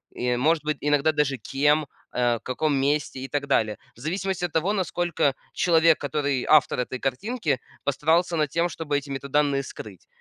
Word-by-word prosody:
и, 125 0 0
может 155 +3 +2
быть, 150 -1 -1
иногда 145 +1 +2
даже 145 -3 0
кем, 145 +6 +1 0.3
э, 120 -1 +2
в - - -13
каком 145 +4 -1
месте 140 -1 0
и 135 - -5
так 145 0 -2
далее. 110 -6 +2 0.2
В - - -20
зависимости 185 +5 -2
от 170 - -6
того, 170 +5 +1
насколько 175 -7 0 0.2
человек, 165 -2 +4
который 140 -2 -1
автор 150 -4 +4
этой 125 +1 -2
картинки, 150 - -1 0.2
постарался 160 +5 +1
над 150 -2 +1
тем, 170 +3 +1
чтобы 145 -3 -2
эти 140 0 -6
метаданные 140 0 0
скрыть. 105 -7 -10
145 Hz, 175 wpm, -25 LUFS, 135-160 Hz, 0.3 s, человек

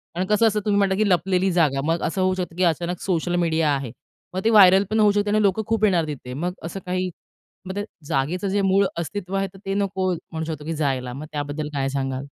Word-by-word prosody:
कारण 180 +2 0
कसं 210 +2 +4
असतं 215 -1 +1
तुम्ही 205 -1 +2
म्हंटला 195 -1 +2
की 215 0 +2
लपलेली 185 +1 +2
जागा 150 -6 +2
मग 165 +1 0
असं 190 +3 -1
होऊ 185 0 +2
शकतं 175 -3 -4
की 185 - 0
अचानक 175 +1 0
सोशल 175 -1 -1
मीडिया 165 -3 +1
आहे 135 -4 -4 0.4
मग 185 +1 -3
ते 225 - +5
व्हायरल 195 -3 +7
पण 220 0 +1
होऊ 210 -1 +5
शकते 205 0 0
आणि 215 +1 +2
लोकं 205 +1 +2
खूप 225 -1 0
येणार 175 -6 +2
तिथे 130 -4 -6
मग 175 +7 -2
असं 165 +4 -5
काही, 185 0 -1 0.6
मग 190 +1 -6
ते 205 - -2 0.2
जागेचं 155 +9 -1
जे 200 +1 +1
मूळ 195 +1 +3
अस्तित्व 185 +3 -4
आहे 195 0 0
तर - - -13
ते 195 - -1
नको 190 -2 0
म्हणू 160 -1 -6
शकतो 155 -2 -6
की 165 - -2
जायला, 135 -5 -1
मग 140 +4 -7
त्याबद्दल 150 0 -4
काय 135 -1 -1
सांगाल? 135 -1 -3
180 Hz, 235 wpm, -23 LUFS, 155-195 Hz, 0.6 s, व्हायरल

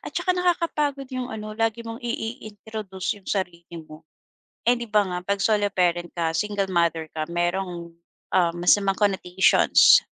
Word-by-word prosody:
at - - -7
tsaka 365 - +1
nakakapagod 315 -6 0
yung 255 -1 -3
ano, 215 -1 -6
lagi 225 +1 -1
mong 230 +1 -7
i 240 - -5 0.3
i-introduce 205 -2 -6
yung - - -13
sarili 175 -3 -3
mo. 155 -1 -11 0.6
Eh, 245 +1 +5
'di 235 -1 -6
ba, 210 -1 +3
nga, 180 -2 -3
'pag 200 0 -1
solo 210 -2 +2
parent 175 -2 +1
ka, 165 -2 -1
single 205 -2 -1
mother 170 -2 +1
ka, 155 0 -4
merong, 175 0 -2 0.4
uhm, 175 -2 +3
masamang 195 +2 +3
connotations 190 -3 +5
195 Hz, 160 wpm, -24 LUFS, 175-220 Hz, 0.6 s, Eh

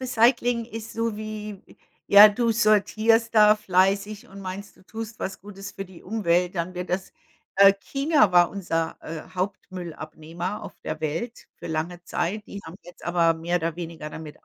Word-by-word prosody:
Recycling 240 -1 +2
ist 225 -1 -8
so 230 -2 -2
wie, 215 -2 -7 0.4
ja, 205 +1 +10
du 230 +3 0
sortierst 225 +1 +3
da 215 -1 +7
fleißig 200 +1 +1
und 200 +1 -11
meinst, 195 +1 -7
du - - -21
tust 225 +1 -7
was 190 0 -5
Gutes 200 0 -9
für 195 - -6
die 185 -2 -15
Umwelt, 180 -3 0
dann 175 +1 -3
wird 180 0 -5
das, 185 +1 -2 0.4
äh 195 0 +8
China 275 - +2
war 175 -1 +5
unser, 165 -4 -2
äh, 160 -1 -7
Hauptmüll-Abnehmer 180 -1 -5
auf - - -10
der 155 - -5
Welt 165 +10 -4
für - - -9
lange 165 +2 -3
Zeit. 195 +6 -3
Die 200 - -8
haben 160 - -9
jetzt 175 - -14
aber 170 -1 +3
mehr 170 +2 -1
oder 165 -1 -2
weniger 165 -3 -7
damit 155 -2 -10
195 Hz, 170 wpm, -25 LUFS, 175-215 Hz, 0.4 s, ja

